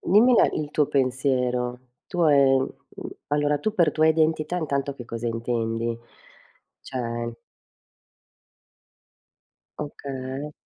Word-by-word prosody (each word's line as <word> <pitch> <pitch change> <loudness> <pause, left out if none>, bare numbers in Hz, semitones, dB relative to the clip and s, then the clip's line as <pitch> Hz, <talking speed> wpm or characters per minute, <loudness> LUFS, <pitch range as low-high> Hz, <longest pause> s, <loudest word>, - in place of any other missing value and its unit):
Dimmi 230 +7 +5
la - - +5
il 150 -1 -3
tuo 150 -1 +2
pensiero. 125 -2 0 0.3
Tu, 175 - -1
ehm, 135 -2 +5 0.3
mhmm, - - -7 0.2
allora 145 0 +1
tu 215 0 -2
per 165 -6 +3
tua 155 0 +3
identità 160 +1 +2
intanto 140 -4 -1
che 125 - -9
cosa 115 0 -5
intendi? 115 0 -1 0.8
Cioè 120 -2 -4 2.4
Okay. 140 0 -5
140 Hz, 105 wpm, -25 LUFS, 125-155 Hz, 2.4 s, Dimmi